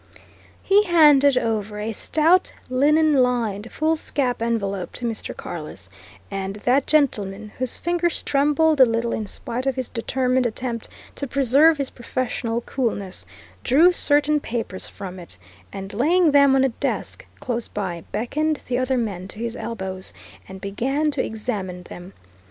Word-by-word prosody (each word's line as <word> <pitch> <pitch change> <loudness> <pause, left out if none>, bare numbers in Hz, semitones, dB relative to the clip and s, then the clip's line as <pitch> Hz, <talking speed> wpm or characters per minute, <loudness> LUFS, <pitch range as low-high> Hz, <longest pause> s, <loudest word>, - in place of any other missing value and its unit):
He 410 +2 +4
handed 295 -6 +6
over 215 -3 -1
a 215 +2 -3
stout 320 - +2 0.2
linen 300 +4 +4
lined 235 -4 0
foolscap 295 -6 -1
envelope 200 -5 -2
to 245 - -4
Mr. 225 -2 -4
Carless, - - -8 0.4
and 195 0 -4
that 250 +6 +1
gentleman, 215 -9 +1
whose 255 -1 -1
fingers 345 -1 -1
trembled 295 +1 +2
a - - +10
little 230 0 -1
in 215 - -3
spite 245 +6 -3
of 270 - +1
his 260 -2 -3
determined 255 +1 0
attempt 235 0 -4 0.2
to 280 - -3
preserve 280 +5 +4
his 275 -2 -2
professional 240 -1 -3
coolness, 220 -8 -2 0.4
drew 315 +8 +5
certain 300 -2 +3
papers 225 -8 -4
from 185 -2 -8
it, 170 - -9 0.3
and 195 +1 -7
laying 320 - +3
them 280 -1 +5
on 265 - +4
a 270 - +3
desk - - -3
close 240 -2 -3
by, 180 -5 -4
beckoned 300 +8 -1
the 250 0 0
other 255 0 0
men 200 -6 -3
to 195 - -7
his 230 +1 -4
elbows, 190 -5 -5 0.3
and 190 0 -9
began 270 +10 -1
to 275 -3 0
examine 200 -5 -4
them. 175 +2 -11
245 Hz, 150 wpm, -22 LUFS, 210-285 Hz, 0.4 s, a